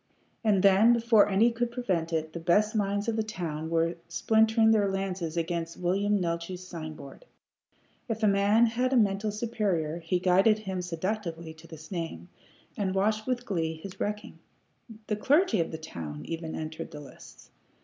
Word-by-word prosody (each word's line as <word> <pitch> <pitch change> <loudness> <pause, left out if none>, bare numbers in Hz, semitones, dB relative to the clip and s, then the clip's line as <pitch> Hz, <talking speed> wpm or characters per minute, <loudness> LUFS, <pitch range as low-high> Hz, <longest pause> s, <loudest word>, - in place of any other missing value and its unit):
And 205 -4 +3
then, 200 +4 +6
before 230 -3 +4
any 215 +5 +4
could 235 +1 -1
prevent 190 -9 -2
it, 160 -1 -2
the 170 - -5
best 205 +7 +2
minds 205 0 0
of 230 - 0
the - - +2
town 165 -7 -4
were 165 +1 +1
splintering 220 0 +3
their 205 -3 +3
lances 190 -4 -3
against 165 0 -2
William 200 +3 +1
Neeltje's 175 +1 -3
sign 155 -3 -7
board. 140 - -12 0.9
If 225 0 -3
a - - +5
man 200 +3 +4
had 250 +3 0
a - - +4
mental 205 -1 +2
superior, 200 -8 -1
he 170 +2 -1
guided 190 +4 +4
him 190 -4 -4
seductively 170 -2 -4
to 160 +1 -16
this 160 -1 -12
name, 165 - -5 0.5
and 195 -2 -2
watched 215 +3 +1
with 250 -1 -1
glee 165 -6 -1
his 185 +4 -10
wrecking. 210 0 -4 0.7
The 210 - -2
clergy 285 - +3
of 165 - 0
the 160 - -5
town 80 - -7
even 165 -1 -5
entered 160 0 -6
the 150 - -9
lists. 145 - -14
190 Hz, 170 wpm, -28 LUFS, 165-215 Hz, 0.9 s, then